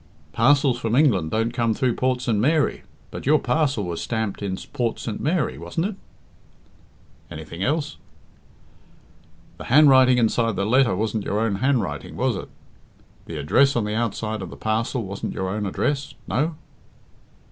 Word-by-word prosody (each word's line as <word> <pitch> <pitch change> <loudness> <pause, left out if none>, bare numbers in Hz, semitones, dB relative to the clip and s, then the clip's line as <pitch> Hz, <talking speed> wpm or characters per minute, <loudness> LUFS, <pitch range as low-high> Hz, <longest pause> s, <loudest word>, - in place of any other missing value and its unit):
"Parcels 135 0 +3
from 115 0 -1
England 110 - +3
don't 115 +5 0
come 115 -2 0
through 125 -2 +1
Port 130 0 0
St. 120 -3 0
Mary, 150 +6 +1 0.3
but - - -7
your 155 +2 +6
parcel 135 -4 0
was 85 -2 -4
stamped 110 -4 -3
in 95 -2 -3 0.2
Port 120 -2 -1
St. 110 - -5
Mary, 160 +2 0
wasn't 165 - -3
it?" 205 0 -3 1.3
"Anything 80 +3 -8
else?" 150 +5 -1 1.6
"The - - -7
handwriting 130 -2 +6
inside 115 -1 +1
the 100 +1 -1
letter 125 -2 +3
wasn't 110 +1 -2
your 105 - -1
own 110 -3 0
handwriting, 115 - -1
was - - 0
it? - - -7 0.8
The 80 - -6
address 130 - +3
on 120 - +1
the 105 - -3
outside 110 -1 -2
of 95 - -6
the - - -10
parcel 115 +3 -1
wasn't 100 0 -5
your 95 0 -2
own 105 +1 -2
address 140 +7 -2
no?" 155 +5 0
115 Hz, 160 wpm, -23 LUFS, 105-135 Hz, 1.6 s, your